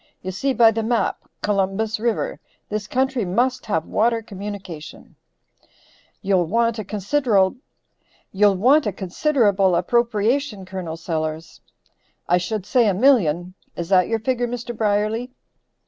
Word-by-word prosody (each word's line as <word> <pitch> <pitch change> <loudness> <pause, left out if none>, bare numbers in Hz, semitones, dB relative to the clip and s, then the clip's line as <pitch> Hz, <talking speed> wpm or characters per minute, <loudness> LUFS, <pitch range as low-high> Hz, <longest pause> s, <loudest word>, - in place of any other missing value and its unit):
You 185 - -3
see 270 +9 -1
by 230 -3 +5
the 225 +1 -2
map. 230 +1 -1
Columbus 205 +2 0
River. 230 0 -1 0.3
This 210 0 -3
country 260 0 0
must 245 +8 0
have 165 -6 0
water 230 +1 +1
communication!" 195 -6 -8 1.1
"You'll 190 -4 +2
want 230 +3 +1
a - - -3
considerable 205 -1 +1 0.8
appropriation, 210 - +2
Col. 185 -4 -6
Sellers. 160 0 -4 0.7
"I 175 +1 +3
should 190 +2 -3
say 235 +2 +3
a 200 - +2
million; 185 - +3 0.2
is 170 0 -5
that 185 -2 +4
your 225 - 0
figure 245 +2 -1
Mr. 240 0 -5
Brierly." 215 +3 0
210 Hz, 115 wpm, -22 LUFS, 185-235 Hz, 1.1 s, by